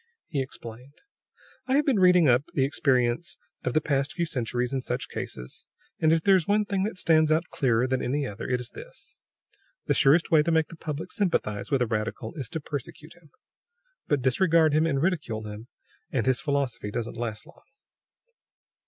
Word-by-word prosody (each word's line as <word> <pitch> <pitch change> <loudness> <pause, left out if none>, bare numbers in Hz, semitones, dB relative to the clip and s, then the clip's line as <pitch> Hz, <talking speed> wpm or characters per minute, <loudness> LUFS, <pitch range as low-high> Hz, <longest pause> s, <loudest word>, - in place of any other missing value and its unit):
He 140 - -2
explained: 125 0 -9 0.7
"I 260 - +2
have 295 +1 +3
been 260 -8 +2
reading 180 -3 +6
up 125 +2 +4
the 135 - +3
experience 130 +2 0 0.3
of 125 - -2
the 155 - +4
past 140 -1 0
few 170 - -1
centuries 125 -4 -2
in 135 - 0
such 125 0 -4
cases; 60 -1 -7 0.3
and 155 - +3
if 165 -1 +2
there 200 - +5
is 185 -4 +3
one 210 +1 +2
thing 200 -2 -1
that 215 -3 -4
stands 160 -3 +3
out 160 +2 +1
clearer 125 -3 +2
than 130 0 0
any 140 +3 -1
other 105 -1 -6
it 125 -1 +1
is 125 - -8
this: 410 -5 -11 0.7
the - - +2
surest 150 +5 +4
way 155 -2 +6
to 150 - -1
make 160 -2 +2
the - - -10
public 155 +2 -5
sympathize 135 - -1
with 135 -3 +2
a - - +1
radical 110 0 -3
is 135 -7 -6
to 160 - -4
persecute 150 +1 -7
him. 175 -3 -22 0.8
But 145 -4 +1
disregard 160 +3 +3
him 155 +2 +3
and 140 -4 0
ridicule 140 - -1
him, 105 +2 -8 0.4
and 125 -7 -1
his 130 -3 +2
philosophy 135 -7 -1
doesn't 115 +2 -4
last 115 +1 -4
long. 175 - -18
140 Hz, 190 wpm, -26 LUFS, 125-165 Hz, 0.8 s, reading